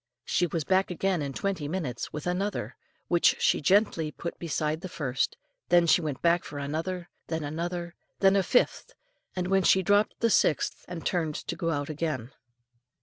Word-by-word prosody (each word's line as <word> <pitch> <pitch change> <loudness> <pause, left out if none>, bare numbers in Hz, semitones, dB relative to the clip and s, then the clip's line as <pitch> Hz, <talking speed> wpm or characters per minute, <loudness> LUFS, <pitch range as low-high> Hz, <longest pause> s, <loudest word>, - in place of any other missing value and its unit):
She 175 - +1
was 165 -1 -2
back 190 +4 +2
again 185 -1 0
in 140 -1 -3
twenty 185 -1 -2
minutes 150 -8 -3
with 150 - -6
another, 185 +3 -2 0.3
which 175 -1 +4
she - - +3
gently 175 -2 +3
put 170 +3 -6
beside 155 -1 -1
the 185 - -6
first, 135 -6 -1 0.3
then 175 -1 +5
she 170 - +4
went 150 -4 -4
back 170 +1 +3
for 145 - -8
another, 165 +5 -3 0.2
then 160 -1 -2
another, 170 +3 -4 0.3
then 195 0 +5
a 195 - +4
fifth, 245 +7 +1 0.4
and 180 -1 -1
when 195 0 +3
she 190 0 +4
dropped 205 +3 +2
the 230 -1 +2
sixth 150 - +2
and 175 -2 -7
turned 160 -4 0
to - - -4
go 165 -3 -2
out 145 -3 -1
again. 150 -6 -3
170 Hz, 180 wpm, -28 LUFS, 150-185 Hz, 0.4 s, then